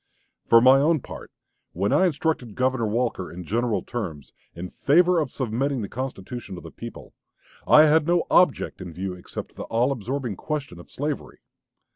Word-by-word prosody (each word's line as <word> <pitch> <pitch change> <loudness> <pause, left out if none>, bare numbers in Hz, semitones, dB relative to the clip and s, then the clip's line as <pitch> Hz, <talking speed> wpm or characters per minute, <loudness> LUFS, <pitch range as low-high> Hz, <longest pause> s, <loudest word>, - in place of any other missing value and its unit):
"For 115 0 +7
my 130 +2 +7
own 155 +1 +2
part, - - -10 0.4
when 100 +4 0
I 190 - +4
instructed 145 - -2
Governor 130 -3 +1
Walker 115 -4 -1
in 90 +1 -8
general 115 +4 -1
terms, 85 - -6 0.2
in 90 +2 -7
favor 175 +4 +3
of 150 -4 -1
submitting 130 +1 -2
the - - -4
constitution 125 -4 -6
to 85 - -9
the - - -10
people, - - -10 0.5
I 150 0 +8
had 155 0 +4
no 175 0 +3
object 175 - +3
in 90 -2 -7
view 95 +2 -4
except 90 - -9
the - - -5
all 120 +4 +1
absorbing 125 -3 -3
question 145 - -4
of 85 - -14
slavery.... 145 +1 -5
125 Hz, 170 wpm, -24 LUFS, 100-145 Hz, 0.5 s, I